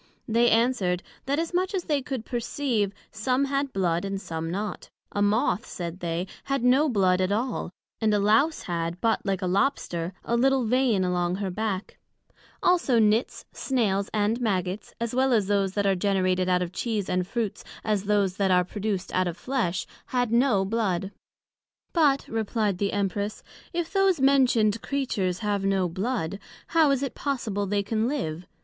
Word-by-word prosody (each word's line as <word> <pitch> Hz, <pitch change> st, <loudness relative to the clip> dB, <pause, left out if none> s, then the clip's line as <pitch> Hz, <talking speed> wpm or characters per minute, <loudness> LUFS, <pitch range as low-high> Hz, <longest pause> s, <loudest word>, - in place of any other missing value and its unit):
They 235 Hz, +1 st, +4 dB
answered, 225 Hz, -7 st, +2 dB, 0.2 s
That, 280 Hz, +1 st, +1 dB
as 330 Hz, +2 st, -2 dB
much 370 Hz, +3 st, 0 dB
as 365 Hz, -, -1 dB
they 295 Hz, -4 st, 0 dB
could 255 Hz, -3 st, -5 dB
perceive, 235 Hz, -4 st, -1 dB, 0.2 s
some 250 Hz, +5 st, 0 dB
had 275 Hz, 0 st, -1 dB
Blood, 175 Hz, -4 st, 0 dB
and 195 Hz, 0 st, -3 dB
some 165 Hz, -3 st, -4 dB
not; 205 Hz, +4 st, -4 dB, 0.2 s
a 205 Hz, -, -2 dB
Moth, 205 Hz, +2 st, +1 dB
said 175 Hz, 0 st, -6 dB
they, 170 Hz, 0 st, -2 dB, 0.2 s
had 275 Hz, -3 st, -1 dB
no 265 Hz, +5 st, +4 dB
Blood 190 Hz, -5 st, +3 dB
at 185 Hz, +1 st, +1 dB
all, 235 Hz, +1 st, -1 dB, 0.3 s
and 220 Hz, -1 st, +2 dB
a 210 Hz, -, +3 dB
Lowse 220 Hz, +10 st, +3 dB
had, 170 Hz, 0 st, -3 dB
but 225 Hz, +2 st, +1 dB
like 195 Hz, -1 st, 0 dB
a -, -, +1 dB
Lobster, 180 Hz, -4 st, 0 dB
a 235 Hz, -, 0 dB
little 265 Hz, +1 st, +3 dB
Vein 240 Hz, -4 st, +2 dB
along 180 Hz, -1 st, 0 dB
her 195 Hz, -1 st, -3 dB
back: 205 Hz, 0 st, -3 dB, 0.6 s
Also 345 Hz, -9 st, +3 dB
Nits, 220 Hz, +2 st, +2 dB
Snails, 210 Hz, -7 st, 0 dB
and 215 Hz, +3 st, 0 dB
Maggots, 190 Hz, -3 st, -2 dB
as 235 Hz, 0 st, -2 dB
well 260 Hz, +1 st, +2 dB
as 215 Hz, -4 st, +3 dB
those 195 Hz, -1 st, +1 dB
that 205 Hz, 0 st, 0 dB
are 195 Hz, -, +4 dB
generated 185 Hz, -1 st, +1 dB
out 180 Hz, 0 st, +3 dB
of 175 Hz, -, -5 dB
Cheese 215 Hz, -5 st, -2 dB
and 180 Hz, 0 st, 0 dB
Fruits, 225 Hz, -2 st, -3 dB, 0.2 s
as 210 Hz, -2 st, 0 dB
those 200 Hz, -2 st, +1 dB
that 195 Hz, -1 st, +2 dB
are 180 Hz, -1 st, +4 dB
produced 195 Hz, -1 st, -3 dB
out 185 Hz, 0 st, +2 dB
of 175 Hz, 0 st, -4 dB
Flesh, 185 Hz, -10 st, -1 dB, 0.2 s
had 245 Hz, -3 st, 0 dB
no 235 Hz, -5 st, +3 dB
blood: 195 Hz, -3 st, -1 dB, 0.8 s
But, 290 Hz, -5 st, +3 dB
replied 215 Hz, -3 st, -1 dB
the 200 Hz, -1 st, 0 dB
Empress, 200 Hz, +1 st, -2 dB, 0.3 s
If 340 Hz, 0 st, -3 dB
those 390 Hz, -4 st, +3 dB
mentioned 250 Hz, -6 st, +3 dB
creatures 205 Hz, -10 st, -1 dB
have 205 Hz, -1 st, 0 dB
no 195 Hz, -2 st, +2 dB
blood, 195 Hz, 0 st, -2 dB, 0.3 s
how 320 Hz, -3 st, +4 dB
is 275 Hz, -1 st, +1 dB
it 275 Hz, -, -3 dB
possible 220 Hz, -8 st, -2 dB
they 200 Hz, +1 st, 0 dB
can 220 Hz, +2 st, 0 dB
live? 180 Hz, -, -3 dB
210 Hz, 175 wpm, -26 LUFS, 185-250 Hz, 0.8 s, They